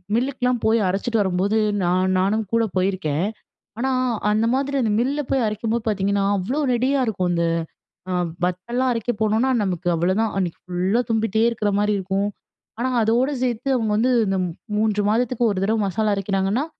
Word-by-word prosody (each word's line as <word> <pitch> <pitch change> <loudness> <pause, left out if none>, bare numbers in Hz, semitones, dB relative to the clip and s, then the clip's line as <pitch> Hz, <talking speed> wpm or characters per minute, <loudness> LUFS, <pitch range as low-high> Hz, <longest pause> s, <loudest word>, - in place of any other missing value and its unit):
மில்லுக்கெல்லாம் 250 -1 0
போய் 225 +1 +4
அரச்சுட்டு 215 +5 0
வரும்போது, 195 +2 +1 0.3
நான் 185 +2 +2
நானும் 210 +4 +1
கூட 230 0 +3
போயிருக்கேன். 185 -4 0 0.5
ஆனா, 265 +3 0 0.4
அந்த 215 +2 +2
மாதிரி 280 +1 -1
அந்த 220 -3 +1
மில்ல 275 +4 0
போய் 265 -3 +2
அரைக்கும்போது 220 +2 -2
பார்த்தீங்கன்னா, 200 -1 +1
அவ்ளோ 230 +11 -2
நெடியா 260 +3 +1
இருக்கும். 185 -4 -1
அந்த 170 -1 +1 0.7
அ - - 0 0.3
வத்தல்லாம் 235 +9 -1
அரைக்க 230 +1 -1
போனோனா, 220 +4 +2
நமக்கு 180 -2 -3
அவ்ளதான். 190 +6 +1
அன்னக்கி 180 -4 -2
ஃபுல்லா 185 +6 0
தும்பிட்டே 225 -1 +1
இருக்கிற 215 -3 -1
மாரி 210 0 +2
இருக்கும். 195 +2 -1 0.5
ஆனா, 255 +2 0
அதோட 235 +5 +2
சேர்த்து 245 +1 -1
அவுங்க 225 -4 0
வந்து 245 +4 +2 0.2
இந்த 195 0 0 0.4
3 210 -1 +1
மாதத்துக்கு 240 +1 +1
ஒரு 195 - -2
தடவ 220 +2 +1
மசாலா 210 +3 0
அரைக்கிறாங்கன்னா, 195 +6 0
215 Hz, 155 wpm, -22 LUFS, 190-235 Hz, 0.7 s, போய்